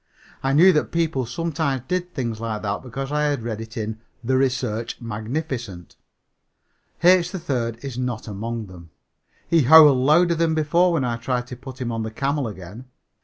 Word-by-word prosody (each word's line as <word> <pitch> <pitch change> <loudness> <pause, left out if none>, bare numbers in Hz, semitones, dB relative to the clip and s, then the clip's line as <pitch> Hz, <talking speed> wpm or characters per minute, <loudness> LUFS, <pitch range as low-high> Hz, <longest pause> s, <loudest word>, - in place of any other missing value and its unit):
I 135 0 0
knew 180 +6 +7
that 150 - 0
people 160 -7 0
sometimes 140 -2 -2
did 180 0 -2
things 120 -6 -3
like 110 -2 -4
that 100 0 -2
because 135 +2 -6
I 150 0 +1
had 145 -5 -1
read 110 -2 -4
it 115 +1 -9
in 110 0 -4 0.2
The 130 +3 +1
Research 125 -4 -1
Magnificent. 115 - -5 1.1
H. 180 0 +5
3rd 120 - -3
is 130 -3 -5
not 125 -3 -3
among 110 +2 -4
them. 90 -3 -13 0.6
He 165 -1 +4
howled 150 -1 +8
louder 160 +6 +4
than 165 -1 +1
before 170 +4 +3
when 145 -6 +1
I 120 -1 -1
tried 125 +1 -2
to 125 - -6
put 130 +1 -11
him 120 -2 -3
on 115 -1 -3
the 110 - -3
camel 135 +3 -1
again. 100 +4 -9
130 Hz, 175 wpm, -23 LUFS, 115-150 Hz, 1.1 s, howled